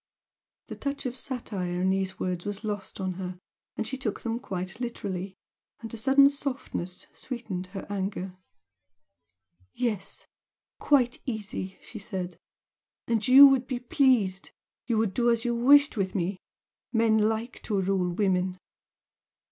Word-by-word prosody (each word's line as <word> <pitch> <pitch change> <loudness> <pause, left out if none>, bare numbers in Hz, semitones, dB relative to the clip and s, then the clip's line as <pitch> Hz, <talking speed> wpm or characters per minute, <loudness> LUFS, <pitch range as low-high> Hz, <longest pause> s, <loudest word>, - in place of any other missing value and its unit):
The - - -5
touch 280 -1 -4
of 250 -1 -2
satire 205 -10 -3
in 190 +1 +2
these 190 0 -1
words 180 -1 -2
was 205 +1 -5
lost 205 -2 -4
on 185 -1 -1
her, 180 0 -5 0.5
she 265 +4 -5
took 220 -6 -3
them 230 0 -2
quite 190 -3 -5
literally, 195 -6 -4 0.4
and 225 0 -8
a - - -4
sudden 270 +4 +6
softness 270 -10 -3
sweetened 220 -8 -5
her 195 +1 -7
anger. 190 -2 -3 1.4
"Yes! 225 -6 -3 0.5
quite 255 -4 +3
easy!" 210 -5 -4
she 220 - -9
said 185 -3 -5 0.7
"And 225 -2 0
you 270 +3 +11
would 265 -2 +2
be 255 - -2
pleased! 245 -7 +2 0.4
You 230 -3 +1
would 215 -3 +1
do 240 +2 +2
as 235 0 +1
you 240 - +1
wished 280 +4 +5
with 190 -1 -1
me 185 0 -1 0.5
men 225 -2 +3
like 220 +3 -1
to 205 -3 0
rule 190 -1 +1
women!" 185 -1 +1
215 Hz, 140 wpm, -28 LUFS, 190-245 Hz, 1.4 s, you